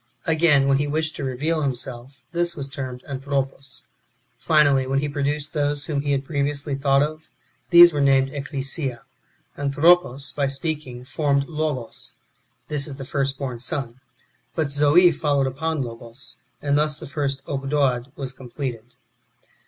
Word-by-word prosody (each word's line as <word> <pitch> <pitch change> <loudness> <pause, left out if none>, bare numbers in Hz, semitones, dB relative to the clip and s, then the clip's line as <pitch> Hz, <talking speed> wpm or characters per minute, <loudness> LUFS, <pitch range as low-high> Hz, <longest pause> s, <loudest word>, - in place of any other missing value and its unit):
Again, 155 -4 +4
when 135 0 +3
he 145 - 0
wished 155 +2 -1
to - - -4
reveal 150 +5 -1
himself, 130 -1 -4
this 175 0 0
was 140 -2 -5
termed 130 -2 -6
Anthropos. 135 -2 -4 0.5
Finally, 140 -2 +4
when 135 +1 0
he 145 +2 0
produced 145 +1 -2
those 145 -1 0
whom 145 -4 -1
he 145 0 -1
had 135 -1 0
previously 145 0 -1
thought 135 0 +3
of, 155 +1 -5 0.4
these 175 -1 +9
were 145 - 0
named 135 -1 +4
Ecclesia. 135 -2 -3 0.6
Anthropos, 145 0 +3
by 140 -2 0
speaking, 135 -3 -3
formed 140 -1 0
Logos: 150 -7 -3 0.5
this 145 -1 0
is 140 - -6
the 135 -1 -7
first 135 0 -1
born 130 -4 -4
son. 125 0 -4 0.6
But 155 -3 0
Zoe 150 +5 +6
followed 145 -4 +1
upon 145 +3 -1
Logos; 115 +1 -7 0.2
and 145 0 +2
thus 150 0 +1
the - - -8
first 140 -1 -2
Ogdoad 135 -3 0
was 135 -2 -4
completed. 125 -2 -6
140 Hz, 150 wpm, -23 LUFS, 135-150 Hz, 0.6 s, these